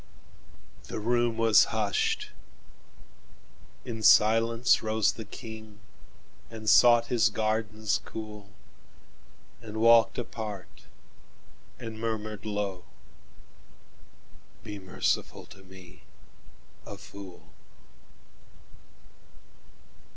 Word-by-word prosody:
The -, -, -6 dB
room 120 Hz, +1 st, 0 dB
was 115 Hz, -1 st, +5 dB
hushed; 105 Hz, -3 st, -1 dB, 1.5 s
in 115 Hz, -3 st, -6 dB
silence 115 Hz, +3 st, +4 dB
roseThe 110 Hz, 0 st, -1 dB
King, 110 Hz, -2 st, -10 dB, 0.7 s
and 110 Hz, -1 st, -10 dB
sought 120 Hz, +1 st, +6 dB
his 120 Hz, -1 st, +2 dB
gardens 110 Hz, -1 st, -1 dB
cool, 105 Hz, -2 st, -9 dB, 1.1 s
And 110 Hz, -2 st, -8 dB
walked 115 Hz, +1 st, +5 dB
apart, 105 Hz, -7 st, -7 dB, 0.9 s
and 115 Hz, -1 st, -8 dB
murmured 110 Hz, -2 st, -4 dB
low,"Be 100 Hz, +1 st, -11 dB
merciful 95 Hz, -1 st, -2 dB
to 95 Hz, -, -16 dB
me, 95 Hz, -1 st, -15 dB, 0.8 s
a 100 Hz, -, -9 dB
fool!" 100 Hz, -2 st, -13 dB
110 Hz, 70 wpm, -28 LUFS, 105-115 Hz, 1.5 s, sought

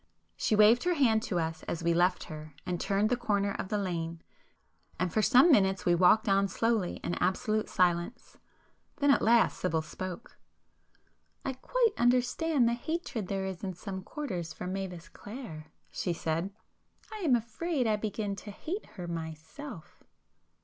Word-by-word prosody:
She 215 Hz, -, +1 dB
waved 215 Hz, +3 st, +6 dB
her 355 Hz, -1 st, +2 dB
hand 230 Hz, -7 st, +3 dB
to 210 Hz, -6 st, -2 dB
us 160 Hz, -1 st, -3 dB
as 170 Hz, 0 st, -3 dB
we 170 Hz, 0 st, +3 dB
left 180 Hz, +2 st, +2 dB
her 155 Hz, -2 st, -9 dB
and 180 Hz, -1 st, -2 dB
turned 205 Hz, +2 st, +1 dB
the -, -, +4 dB
corner 205 Hz, -4 st, 0 dB
of -, -, -3 dB
the 210 Hz, -, 0 dB
lane,—and 165 Hz, -, -6 dB
for 215 Hz, -, +3 dB
some 265 Hz, +9 st, +6 dB
minutes 190 Hz, -6 st, +3 dB
we 175 Hz, -, +4 dB
walked 185 Hz, +6 st, +5 dB
on 195 Hz, 0 st, +3 dB
slowly 225 Hz, -3 st, 0 dB
in -, -, -2 dB
absolute 215 Hz, +4 st, 0 dB
silence. 180 Hz, +5 st, 0 dB, 0.6 s
Then 285 Hz, -1 st, +3 dB
at -, -, +4 dB
last 230 Hz, 0 st, +4 dB
Sibyl 160 Hz, -3 st, 0 dB
spoke— 185 Hz, +6 st, -7 dB, 1.1 s
"I 270 Hz, -, -1 dB
quite 460 Hz, -, +1 dB
understand 250 Hz, +3 st, +3 dB
the 235 Hz, -, +2 dB
hatred 250 Hz, -, -3 dB
there 195 Hz, 0 st, -2 dB
is 190 Hz, -1 st, -5 dB
in 190 Hz, -2 st, -3 dB
some 190 Hz, +1 st, -6 dB
quarters 185 Hz, -, -5 dB
for 180 Hz, -, -7 dB
Mavis 185 Hz, -2 st, -5 dB
Clare,"—she 180 Hz, -, -7 dB
said—"I 185 Hz, -, -6 dB
am 320 Hz, -11 st, +3 dB
afraid 255 Hz, +5 st, -1 dB
I 215 Hz, -1 st, +3 dB
begin 210 Hz, -1 st, -3 dB
to 205 Hz, -, -9 dB
hate 340 Hz, -, -5 dB
her 175 Hz, -1 st, -5 dB
myself!" 165 Hz, -, -8 dB
200 Hz, 155 wpm, -30 LUFS, 175-240 Hz, 1.1 s, waved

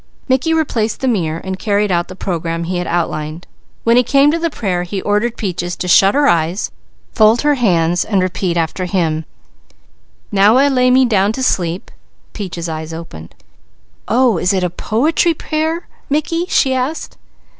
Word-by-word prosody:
Mickey 265 Hz, +4 st, +1 dB
replaced 245 Hz, -9 st, -1 dB
the 265 Hz, -, 0 dB
mirror 165 Hz, -9 st, 0 dB
and 190 Hz, 0 st, -5 dB
carried 205 Hz, -2 st, 0 dB
out 175 Hz, -1 st, 0 dB
the 185 Hz, -, -10 dB
program 170 Hz, -3 st, -3 dB
he 180 Hz, +2 st, -3 dB
had 175 Hz, -, -3 dB
outlined. 160 Hz, -1 st, -3 dB, 0.4 s
When 230 Hz, +1 st, +4 dB
he -, -, +7 dB
came 275 Hz, +3 st, +4 dB
to 335 Hz, -, -1 dB
the 335 Hz, 0 st, 0 dB
prayer 190 Hz, -, -2 dB
he 180 Hz, +3 st, -4 dB
ordered 210 Hz, +3 st, 0 dB
Peaches 175 Hz, -3 st, -3 dB
to 180 Hz, -, -5 dB
shut 195 Hz, +4 st, +5 dB
her 290 Hz, 0 st, +3 dB
eyes, 170 Hz, +3 st, 0 dB, 0.4 s
fold 220 Hz, +2 st, +4 dB
her 295 Hz, 0 st, +3 dB
hands 175 Hz, -, +1 dB
and 200 Hz, -3 st, 0 dB
repeat 185 Hz, -1 st, -1 dB
after 170 Hz, +3 st, -1 dB
him: 165 Hz, -4 st, -1 dB, 1.1 s
"'Now 205 Hz, +3 st, +5 dB
I 280 Hz, +2 st, +4 dB
lay 255 Hz, -2 st, +3 dB
me 260 Hz, +1 st, +5 dB
down 205 Hz, -3 st, +2 dB
to 260 Hz, -, -4 dB
sleep'" 175 Hz, -6 st, -1 dB, 0.4 s
Peaches' 180 Hz, -5 st, -5 dB
eyes 160 Hz, 0 st, -5 dB
opened. 80 Hz, -, -10 dB, 0.7 s
"Oh, 235 Hz, -6 st, +2 dB
is 180 Hz, +2 st, +1 dB
it 190 Hz, -1 st, 0 dB
a 180 Hz, -, -1 dB
poetry 305 Hz, -, +1 dB
prayer, 320 Hz, +3 st, -2 dB, 0.2 s
Mickey?" 330 Hz, +4 st, -1 dB
she 265 Hz, -, +2 dB
asked. 260 Hz, +5 st, -3 dB
200 Hz, 175 wpm, -16 LUFS, 175-255 Hz, 1.1 s, he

